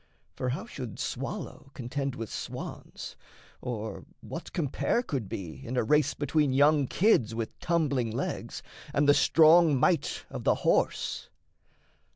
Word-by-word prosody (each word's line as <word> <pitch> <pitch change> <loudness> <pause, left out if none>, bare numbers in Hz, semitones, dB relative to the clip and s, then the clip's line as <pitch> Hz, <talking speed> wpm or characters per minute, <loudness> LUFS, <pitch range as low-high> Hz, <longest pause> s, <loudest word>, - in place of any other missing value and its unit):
for 125 - -2
how 140 - -3
should 125 - -7
swallow - - -5
Contend 135 +1 -3
with 115 -4 -6
swans - - -7 0.5
or 110 -3 -5 0.2
what - - -7
compare 170 - 0
could 130 - -3
be 90 +6 -6
In 125 0 -4
a - - +3
race 150 +6 +2
between 145 -1 +1
young 145 0 +4
kids 125 - +3
with 115 -1 -5
tumbling 150 -9 +1
legs 110 - -4 0.3
And 145 0 +3
the 145 - +8
strong 160 -1 +6
might 170 +5 +1
of - - -5
the - - +3
horse? - - +1
140 Hz, 140 wpm, -29 LUFS, 120-155 Hz, 0.5 s, the